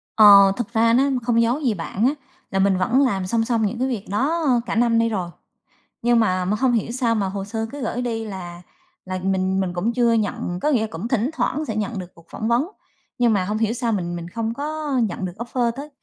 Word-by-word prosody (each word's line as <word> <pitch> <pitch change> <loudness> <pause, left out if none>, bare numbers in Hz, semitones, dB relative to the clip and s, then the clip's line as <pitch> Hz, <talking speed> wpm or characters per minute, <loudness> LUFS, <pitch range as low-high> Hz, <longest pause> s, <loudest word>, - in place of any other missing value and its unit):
Ờ, 200 -2 +8
thực 235 -1 -4
ra 230 0 +3
nó 255 +3 +4 0.2
không 230 -1 +2
giấu 235 +5 +1
gì 260 -7 +1
bạn 195 +4 -2
á, 270 - +3 0.4
là 195 - 0
mình 195 -1 +3
vẫn 230 +9 +2
làm 195 -7 -1
song 225 +3 +1
song 230 -2 +1
những 225 +4 -3
cái 260 - +1
việc 230 -6 -3
đó 295 - 0 0.2
cả - - -3
năm 235 0 +3
nay 230 0 +2
rồi, 185 -5 -3 0.7
nhưng 240 0 +3
mà 185 -4 +1
mà 205 +3 0
hông 260 -1 +3
hiểu 230 -1 0
sao 240 -2 0
mà 200 -3 0
hồ 195 0 -4
sơ 225 +2 -3
cứ 285 0 -7
gửi 240 +1 -2
đi 225 -2 -3
là 175 -4 -7 0.4
là 185 0 -4
mình 190 0 0
mình 185 -2 -1
cũng 190 +7 -1
chưa 235 -1 +3
nhận, 200 -5 -1
có - - +1
nghĩa 255 -7 +2
là 220 - -1
cũng 165 +8 -5
thỉnh 240 +1 0
thoảng 310 -1 -1
sẽ 220 - -4
nhận 215 0 -2
được 180 -1 -9
cuộc 170 - -19
phỏng 220 - -4
vấn, 240 +6 +2 0.5
nhưng 240 -2 +3
mà 190 -3 +1
hông 210 +3 -2
hiểu 220 0 0
sao 235 -1 -1
mình 175 -4 -2
mình 170 -1 -6
không 225 +3 -3
có 295 +1 -3
nhận 195 -3 -3
được 180 - -5
offer 235 0 -1
tới, 280 +5 -8
225 Hz, 250 wpm, -22 LUFS, 195-240 Hz, 0.7 s, Ờ